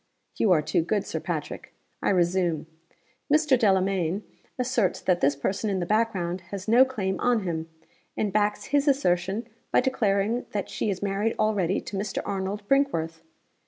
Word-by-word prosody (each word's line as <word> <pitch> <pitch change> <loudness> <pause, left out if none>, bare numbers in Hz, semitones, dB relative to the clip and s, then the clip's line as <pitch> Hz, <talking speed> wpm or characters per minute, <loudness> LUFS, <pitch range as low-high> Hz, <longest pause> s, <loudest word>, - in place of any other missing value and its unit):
'You 210 - +2
are 155 -4 +4
too - - +1
good, 200 +5 -1
Sir - - -3
Patrick. - - -5 0.3
I - - +1
resume. 175 -3 +1 0.7
Mr. 300 -2 +5
Delamayn 195 -4 +1 0.3
asserts 250 -6 +1
that 180 -2 +1
this 140 +1 +3
person 195 +9 -2
in 195 -2 0
the 175 - -1
back 225 +4 +2
ground 175 -1 -3
has 200 +1 -6
no 235 +4 +7
claim 195 -8 -2
on 245 -3 +2
him, 165 -3 -3 0.5
and 205 -2 -1
backs 210 0 +1
his 285 0 +3
assertion 200 -5 +1 0.2
by - - +5
declaring 225 -3 0
that 205 -2 -3
she - - -1
is 195 -1 -3
married 205 +3 0
already 200 -4 +1
to 200 - -6
Mr. 195 0 -3
Arnold 200 +1 -3
Brinkworth. 165 - +1
200 Hz, 165 wpm, -26 LUFS, 180-225 Hz, 0.7 s, no